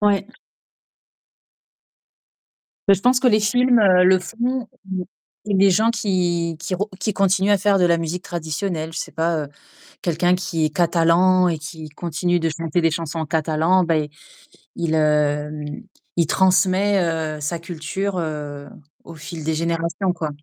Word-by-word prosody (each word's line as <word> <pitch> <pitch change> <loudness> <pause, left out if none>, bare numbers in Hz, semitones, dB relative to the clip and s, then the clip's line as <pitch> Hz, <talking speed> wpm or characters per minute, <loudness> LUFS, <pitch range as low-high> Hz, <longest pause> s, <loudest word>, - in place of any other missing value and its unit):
Ouais. 200 -2 +2 2.6
Heu, - - +9
je 190 - -8
pense 250 +2 +4
que 260 - +3
les 215 -3 +4
films, 245 +3 +3
heu, 185 -3 +5
le 185 0 +5
font 240 +5 -3 0.2
ou 185 -1 -3 0.4
ou 205 -2 0
les 195 +1 +5
gens 220 +5 +3
qui 175 -6 -1
qui 185 +2 -3
re 205 +4 -3
qui 210 +2 -1
continuent 195 +1 +2
à 205 - +5
faire 200 0 +2
de 180 - +4
la 170 -1 +3
musique 165 +2 -4
traditionnelle. 165 0 -4
Je - - -5
sais - - -5
pas, 165 -1 0
heu, - - -8 0.6
quelqu'un 175 +1 +1
qui 165 -3 -2
est 155 - +1
catalan 175 +2 +3
et 165 -2 -1
qui 155 0 -8
continue 175 +3 -1
de 165 - +1
chanter 165 +1 -2
des 165 -1 +2
chansons 165 0 -4
en 160 - -3
catalan 160 +4 +2
beh 155 -3 0 0.7
il 170 - -2
il - - +1
hem, 150 +3 0 0.3
il 170 -3 +3
transmet, 190 +2 +3 0.4
heu, - - -10
sa 150 +4 -2
culture, 175 +4 -4
heu, 150 -3 -5 0.3
au - - -11
fil 155 +1 -8
des 160 +1 -1
générations, 170 +3 -1
quoi. 160 -3 -4
175 Hz, 165 wpm, -21 LUFS, 160-190 Hz, 2.6 s, Heu